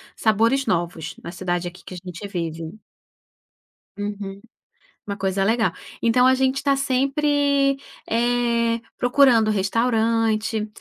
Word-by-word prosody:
sabores 230 +5 +2
novos 170 - -2
na 170 - -6
cidade 175 -1 -2
aqui 175 0 -10
que - - -9
a - - -7
gente 180 +2 -7
vive. 165 -3 -5 1.2
Uhum. 205 -1 -5 0.7
Uma 200 0 -4
coisa 195 0 0
legal. 225 +2 +2 0.3
Então 250 +2 +4
a 260 - +6
gente 265 0 +1
está 275 0 +1
sempre, 275 +1 +2 0.3
eh, 235 0 +1 0.2
procurando 245 -3 +4
restaurante, 220 +1 +1
225 Hz, 115 wpm, -22 LUFS, 195-255 Hz, 1.2 s, a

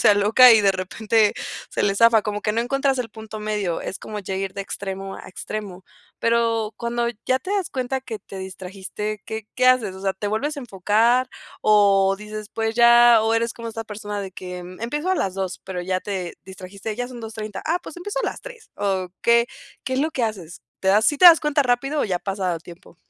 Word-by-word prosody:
se - - +5
aloca 220 +5 +7
y 220 - +6
de 195 -1 +4
repente 210 +3 +1 0.4
se - - -1
le 200 -1 +2
zafa, 230 +1 +5
como 210 0 -3
que 210 - 0
no 230 - 0
encuentras 270 +2 0
el 240 -2 -2
punto 220 0 -9
medio, 210 -5 -2
es - - -5
como 210 -1 -7
ya 190 -1 -5
ir 190 0 -3
de 200 - -5
extremo 195 0 -5
a - - -11
extremo, 190 -1 -7 0.3
pero, 230 -2 +1
cuando 235 0 -1 0.2
ya 260 0 +3
te 375 - -8
das 390 -4 -1
cuenta 260 0 -2
que 230 -4 -6
te 195 0 -10
distrajiste, 190 +2 -6
¿qué 220 -1 -5
qué 255 0 +2
haces? 230 -7 +3
O 190 - -10
sea, 195 0 0
¿te 205 +2 -4
vuelves 280 +9 -1
a - - -4
enfocar? 230 +4 +2 0.3
o 200 -2 +4
dices 210 0 -7
pues, 225 0 -1
ya, 235 0 +7
o 225 +1 +2
eres 230 0 0
como 230 -1 -7
esta 225 0 -6
persona 210 -1 -5
de 190 -2 -6
que 180 -1 -7
empiezo 230 - -4
a - - +3
las 190 - -1
2, 190 -1 -4
pero, 185 -2 -4
ya 185 0 -1
te 185 -4 -4
distrajiste, 190 +3 -7
ya 245 0 -2
son 245 -2 -9
2:30, 215 -2 -6
Ah, 335 +3 +1
pues, 325 - -10
empiezo 410 +7 -4
a - - -1
las - - -4
3, - - -12
¿o 190 -2 -1
qué? 235 0 +4 0.4
¿Qué 260 - -3
es 260 - +1
lo 315 +2 0
que 260 - -3
haces? 185 -7 -6 0.2
Te 190 - 0
das, 210 +3 +4
¿sí 290 - +3
te - - +4
das 330 -2 +9
cuenta 300 -1 +2
rápido 270 +4 0
o - - +1
ya 185 -4 -1
pasa 190 -2 -2
tiempo? 170 0 -15
215 Hz, 225 wpm, -22 LUFS, 195-240 Hz, 0.4 s, das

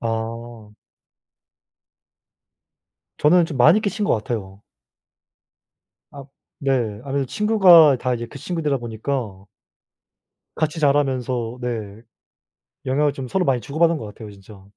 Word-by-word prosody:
아. 115 -1 -5 2.5
저는 170 +3 +4
좀 155 -4 -6
많이 155 - +5
끼친 210 0 -2
것 - - +2
같아요. 105 -3 -5 1.5
아 140 -1 -10 0.4
네 120 -6 -1
아무래도 140 -1 -2
친구가 185 - +5
다 125 0 -1
이제 120 0 -5
그 140 - -11
친구들이다 150 -2 -2
보니까 115 -3 -5 1.1
같이 155 +1 -2
자라면서 130 -5 0
네 110 -4 -5 0.8
영향을 145 +2 +1
좀 130 -1 -7
서로 180 +6 -1
많이 130 -3 +1
주고받은 165 +7 +1
것 115 - -7
같아요 105 +1 -10
진짜. 100 0 -15
130 Hz, 235 characters per minute, -21 LUFS, 115-150 Hz, 2.5 s, 많이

